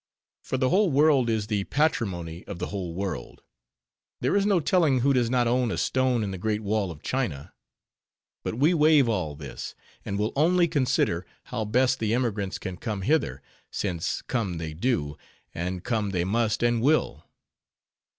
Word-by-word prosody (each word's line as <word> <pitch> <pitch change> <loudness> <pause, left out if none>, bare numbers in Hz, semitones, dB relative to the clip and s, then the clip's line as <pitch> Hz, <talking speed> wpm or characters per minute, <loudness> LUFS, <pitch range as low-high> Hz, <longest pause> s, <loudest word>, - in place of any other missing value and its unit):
For 130 - -3
the 130 0 +2
whole 200 +3 +3
world 140 -4 +4
is 110 -2 0
the 105 -2 -1
patrimony 90 - -1
of 100 - -7
the - - -4
whole 90 -4 -4
world; 95 -10 -5 0.8
there - - +1
is 200 0 +3
no 195 -4 +4
telling 155 -6 +2
who 140 +2 +3
does 120 -3 +2
not 125 -1 +2
own 125 0 +2
a - - -2
stone 130 -3 +1
in 100 - -3
the 95 - -6
Great 110 +2 -1
Wall 105 -2 0
of 80 -3 -10
China. 95 - -3 0.9
But - - -3
we 145 +8 +3
waive 150 -4 +5
all 90 -10 -1
this; 70 -2 -7 0.3
and 100 - -3
will 105 +1 -1
only 170 +4 +4
consider, 130 - 0 0.2
how 115 -3 -4
best 125 +4 +2
the 110 0 +1
emigrants 105 -6 -1
can 95 -1 -6
come 105 -2 -4
hither, 155 +9 0 0.3
since 90 -5 -2
come 100 -9 -2
they 80 -1 -5
do, 80 - -1 0.3
and 90 +1 -4
come 110 -4 -1
they 90 -3 0
must 110 +4 0
and 120 -1 +2
will. 150 +5 +1
115 Hz, 175 wpm, -26 LUFS, 95-130 Hz, 0.9 s, waive